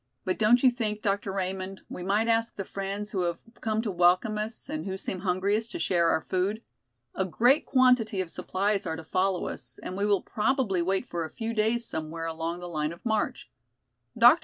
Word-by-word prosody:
"But 185 Hz, -, -1 dB
don't 235 Hz, +4 st, +5 dB
you 255 Hz, -, +7 dB
think, 215 Hz, -3 st, -2 dB
Dr. 200 Hz, -1 st, 0 dB
Raymond, 190 Hz, 0 st, -3 dB
we -, -, -7 dB
might 205 Hz, +5 st, +1 dB
ask 230 Hz, 0 st, +1 dB
the 195 Hz, -, -4 dB
friends 200 Hz, +2 st, -4 dB
who 190 Hz, -, -1 dB
have 170 Hz, -1 st, -1 dB, 0.2 s
come 220 Hz, 0 st, 0 dB
to 215 Hz, -, -1 dB
welcome 180 Hz, +5 st, +3 dB
us 215 Hz, +2 st, -4 dB
and 305 Hz, +2 st, -3 dB
who 190 Hz, 0 st, -3 dB
seem 190 Hz, -1 st, -4 dB
hungriest 200 Hz, +5 st, 0 dB
to -, -, -4 dB
share 170 Hz, 0 st, +2 dB
our 160 Hz, -, +2 dB
food? 195 Hz, +5 st, -1 dB, 0.5 s
A 190 Hz, -, 0 dB
great 240 Hz, -, +3 dB
quantity 250 Hz, -6 st, +4 dB
of 180 Hz, -3 st, -2 dB
supplies 200 Hz, +1 st, -1 dB
are 160 Hz, -, -1 dB
to 160 Hz, -, -8 dB
follow 185 Hz, +2 st, 0 dB
us -, -, -8 dB
and 185 Hz, -, -5 dB
we 200 Hz, +2 st, 0 dB
will 200 Hz, -2 st, +2 dB
probably 215 Hz, -4 st, +1 dB
wait 190 Hz, +6 st, 0 dB
for 170 Hz, -8 st, -3 dB
a 160 Hz, -, -5 dB
few 225 Hz, +4 st, -4 dB
days 225 Hz, +2 st, +1 dB
somewhere 160 Hz, -2 st, -4 dB
along 165 Hz, +1 st, -3 dB
the 175 Hz, -, -6 dB
line 155 Hz, -2 st, -2 dB
of 170 Hz, -, -16 dB
march. 220 Hz, -2 st, -1 dB, 0.7 s
Dr. 240 Hz, +8 st, +8 dB
195 Hz, 210 wpm, -28 LUFS, 180-225 Hz, 0.7 s, Dr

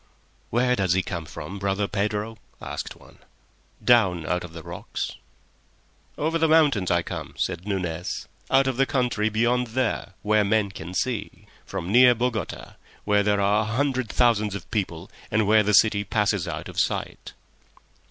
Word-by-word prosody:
"Where 125 Hz, +2 st, +2 dB
does 95 Hz, -6 st, +1 dB
he 95 Hz, 0 st, +1 dB
come 85 Hz, -4 st, -5 dB
from, 95 Hz, +4 st, -7 dB
brother 100 Hz, +1 st, 0 dB
Pedro?" 105 Hz, +2 st, -2 dB, 0.2 s
asked -, -, -6 dB
one. -, -, -19 dB, 0.7 s
"Down 95 Hz, -9 st, +4 dB
out 90 Hz, +3 st, -1 dB
of 90 Hz, -, -9 dB
the 85 Hz, -1 st, -9 dB
rocks." -, -, -5 dB, 1.1 s
"Over 160 Hz, +3 st, 0 dB
the 160 Hz, -, +3 dB
mountains 145 Hz, -, +4 dB
I 85 Hz, -1 st, +2 dB
come," -, -, -6 dB
said 90 Hz, -, -2 dB
Nunez, 90 Hz, -4 st, -3 dB, 0.2 s
"out 135 Hz, +1 st, +4 dB
of 130 Hz, -2 st, -1 dB
the 135 Hz, 0 st, +3 dB
country 120 Hz, -5 st, 0 dB
beyond 120 Hz, +3 st, +1 dB
there—where 110 Hz, -3 st, 0 dB
men 100 Hz, -1 st, +1 dB
can 90 Hz, 0 st, -8 dB
see. 105 Hz, -1 st, -3 dB, 0.2 s
From 95 Hz, -1 st, -4 dB
near 125 Hz, +1 st, +7 dB
Bogota—where 110 Hz, -2 st, -2 dB
there 105 Hz, 0 st, +1 dB
are 100 Hz, +2 st, +3 dB
a -, -, -2 dB
hundred 130 Hz, +1 st, -1 dB
thousands 110 Hz, -4 st, +2 dB
of 100 Hz, -, -8 dB
people, 95 Hz, -4 st, -3 dB, 0.2 s
and 110 Hz, 0 st, +2 dB
where 110 Hz, +1 st, +5 dB
the 105 Hz, 0 st, +2 dB
city 100 Hz, 0 st, +4 dB
passes 105 Hz, -2 st, 0 dB
out 90 Hz, -, -5 dB
of -, -, -5 dB
sight." -, -, -2 dB
105 Hz, 160 wpm, -25 LUFS, 95-120 Hz, 1.1 s, near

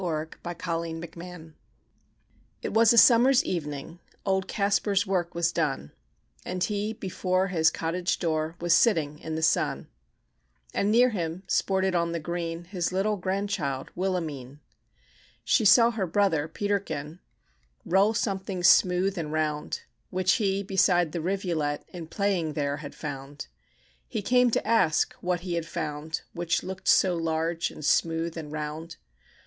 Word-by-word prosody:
THE 160 Hz, -3 st, -2 dB
BATTLE 170 Hz, -1 st, -3 dB, 0.2 s
OF 170 Hz, -, -8 dB
BLENHEIM 170 Hz, -2 st, -10 dB, 1.1 s
It -, -, -3 dB
was 225 Hz, -1 st, +6 dB
a 235 Hz, -, +3 dB
summer's 245 Hz, +3 st, +6 dB
evening; 155 Hz, -1 st, -4 dB, 0.3 s
Old 190 Hz, -1 st, 0 dB
Kaspar's 200 Hz, 0 st, +1 dB
work 180 Hz, -4 st, -1 dB
was 170 Hz, 0 st, +1 dB
done; 145 Hz, -, -2 dB, 0.5 s
And 180 Hz, 0 st, -3 dB
he 210 Hz, +1 st, -1 dB
before 185 Hz, -1 st, -1 dB
his 160 Hz, -3 st, +3 dB
cottage 175 Hz, +2 st, -2 dB
door, 160 Hz, -1 st, -1 dB
Was 175 Hz, 0 st, +2 dB
sitting 160 Hz, -9 st, +3 dB
in 160 Hz, 0 st, -5 dB
the 160 Hz, -, -3 dB
sun; 165 Hz, -, +1 dB, 0.8 s
And 200 Hz, -, +1 dB
near 245 Hz, +3 st, +5 dB
him 170 Hz, -2 st, -3 dB
sported 190 Hz, 0 st, +1 dB
on 170 Hz, -1 st, 0 dB
the 170 Hz, -, -2 dB
green, 170 Hz, +1 st, -4 dB
His 175 Hz, -1 st, -3 dB
little 195 Hz, +3 st, +1 dB
grandchild, 185 Hz, -8 st, -2 dB
Wilhelmine: 155 Hz, -8 st, -3 dB, 0.8 s
She 225 Hz, -, +2 dB
saw 235 Hz, +3 st, +7 dB
her 210 Hz, -5 st, -2 dB
brother, 165 Hz, -4 st, +1 dB
Peterkin, 165 Hz, -4 st, -3 dB, 0.7 s
Roll 195 Hz, +5 st, +3 dB
something 190 Hz, -3 st, -2 dB
smooth 180 Hz, +2 st, +4 dB
and 155 Hz, -2 st, -4 dB
round, 155 Hz, -1 st, -2 dB, 0.3 s
Which 185 Hz, 0 st, +2 dB
he, 200 Hz, -2 st, 0 dB
beside 180 Hz, -4 st, +2 dB
the 170 Hz, -, -3 dB
rivulet, 170 Hz, -5 st, -2 dB
In 170 Hz, -3 st, -8 dB
playing 180 Hz, -4 st, -1 dB
there 145 Hz, -1 st, -1 dB
had 150 Hz, -2 st, -9 dB
found. 140 Hz, -1 st, -7 dB, 0.6 s
He -, -, -4 dB
came 250 Hz, +3 st, +4 dB
to -, -, -1 dB
ask 190 Hz, -9 st, +3 dB
what 180 Hz, -1 st, -1 dB
he 180 Hz, -1 st, -4 dB
had 170 Hz, -1 st, -2 dB
found, 150 Hz, +1 st, -4 dB
Which 170 Hz, -1 st, -1 dB
looked 190 Hz, +1 st, -7 dB
so 185 Hz, -2 st, +4 dB
large, 165 Hz, 0 st, -1 dB
and 155 Hz, -, -9 dB
smooth, 165 Hz, +1 st, +1 dB
and 155 Hz, -3 st, -7 dB
round. 155 Hz, +2 st, -5 dB
175 Hz, 145 wpm, -27 LUFS, 160-195 Hz, 1.1 s, saw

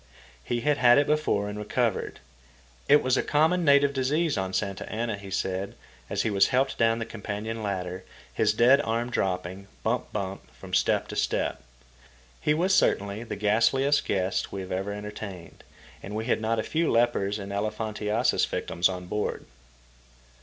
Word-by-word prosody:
He 120 Hz, -, -2 dB
had 150 Hz, +2 st, +2 dB
had 120 Hz, +1 st, +6 dB
it 145 Hz, -, +4 dB
before, 150 Hz, -10 st, +1 dB
and 105 Hz, 0 st, -5 dB
recovered. 110 Hz, 0 st, -1 dB, 0.7 s
It 145 Hz, +1 st, +6 dB
was 130 Hz, 0 st, +2 dB
a -, -, +3 dB
common 160 Hz, +4 st, +2 dB
native 140 Hz, -2 st, +5 dB
disease 145 Hz, +4 st, +1 dB
on 95 Hz, -1 st, -2 dB
Santa 100 Hz, 0 st, -3 dB
Anna, 115 Hz, 0 st, -2 dB
he 100 Hz, -1 st, -10 dB
said, 95 Hz, 0 st, -2 dB, 0.3 s
as -, -, 0 dB
he 110 Hz, -, 0 dB
was 100 Hz, -1 st, +4 dB
helped 135 Hz, +2 st, 0 dB
down 115 Hz, 0 st, +3 dB
the 115 Hz, -, -3 dB
companion 110 Hz, 0 st, -5 dB
ladder, 95 Hz, -3 st, -4 dB, 0.3 s
his -, -, +2 dB
dead 125 Hz, +6 st, +5 dB
arm 115 Hz, 0 st, -2 dB
dropping, 95 Hz, -1 st, -2 dB, 0.2 s
bump -, -, -1 dB
bump, 100 Hz, -2 st, -5 dB
from -, -, -12 dB
step -, -, +2 dB
to -, -, -6 dB
step. -, -, -1 dB, 0.8 s
He 150 Hz, -, +2 dB
was 185 Hz, +4 st, +2 dB
certainly 100 Hz, -, +2 dB
the 120 Hz, -, -5 dB
ghastliest 115 Hz, +7 st, +2 dB
guest 95 Hz, -1 st, -1 dB
we 95 Hz, -1 st, -4 dB
ever 95 Hz, +2 st, -3 dB
entertained, 105 Hz, -3 st, -8 dB, 0.4 s
and 100 Hz, +2 st, -7 dB
we've 110 Hz, +1 st, -2 dB
had 120 Hz, -, +1 dB
not 115 Hz, +1 st, 0 dB
a 110 Hz, -, 0 dB
few 165 Hz, +1 st, 0 dB
lepers 115 Hz, -4 st, +2 dB
and 100 Hz, -1 st, -7 dB
elephantiasis 105 Hz, +2 st, 0 dB
victims 85 Hz, +2 st, 0 dB
on 90 Hz, -1 st, -5 dB
board. 105 Hz, +4 st, -3 dB
110 Hz, 165 wpm, -27 LUFS, 100-125 Hz, 0.8 s, had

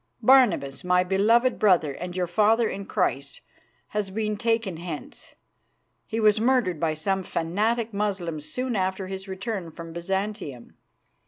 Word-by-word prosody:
Barnabas, 215 Hz, -, +4 dB
my 180 Hz, 0 st, +3 dB
beloved 225 Hz, +7 st, +3 dB
brother 180 Hz, -8 st, +4 dB
and 180 Hz, +4 st, -6 dB
your 180 Hz, -, +1 dB
father 220 Hz, +6 st, +3 dB
in 200 Hz, -1 st, -5 dB
Christ, -, -, -1 dB, 0.5 s
has 210 Hz, -2 st, -2 dB
been 215 Hz, +1 st, -2 dB
taken 225 Hz, -5 st, 0 dB
hence. 165 Hz, -3 st, -8 dB, 0.7 s
He 225 Hz, -, -2 dB
was 215 Hz, -1 st, +4 dB
murdered 235 Hz, -, +2 dB
by 160 Hz, -1 st, 0 dB
some 190 Hz, +5 st, -1 dB
fanatic 215 Hz, +7 st, -1 dB
Moslems 180 Hz, -7 st, -3 dB
soon 255 Hz, -1 st, -2 dB
after 190 Hz, 0 st, -1 dB
his 190 Hz, +1 st, -7 dB
return 190 Hz, -2 st, -4 dB
from 165 Hz, 0 st, -9 dB
Byzantium. 190 Hz, -, -4 dB
195 Hz, 140 wpm, -25 LUFS, 175-220 Hz, 0.7 s, Barnabas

